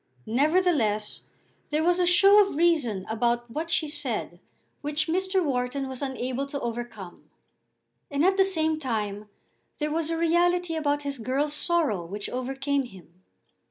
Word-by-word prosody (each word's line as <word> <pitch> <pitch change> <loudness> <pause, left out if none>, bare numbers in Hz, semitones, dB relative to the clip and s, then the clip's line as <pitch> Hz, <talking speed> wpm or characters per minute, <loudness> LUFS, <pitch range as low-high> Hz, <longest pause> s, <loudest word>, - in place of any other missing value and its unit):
Nevertheless 275 - +1 0.5
there 305 +1 0
was 350 +1 +3
a 355 - +3
show 395 +4 +7
of 395 - -5
reason 290 - +2
about 235 +1 0
what 320 +6 -4
she 315 -1 +1
said 295 0 -4 0.4
which 295 +2 -1
Mr. 375 +2 0
Wharton 265 0 -1
was 260 0 -6
unable 265 0 -3
to 280 0 -4
overcome. 225 - -6 0.8
And 285 +3 +1
at 380 +1 +4
the 385 - +5
same 320 -5 +1
time 210 -6 -3 0.5
there 300 0 -2
was 320 0 0
a 330 - -1
reality 345 +1 +2
about 290 -2 0
his 280 -2 -4
girl's 275 +6 -1
sorrow 300 - +1
which 200 +4 -6
overcame 270 +2 -1
him. 180 -5 -16
285 Hz, 150 wpm, -26 LUFS, 240-330 Hz, 0.8 s, show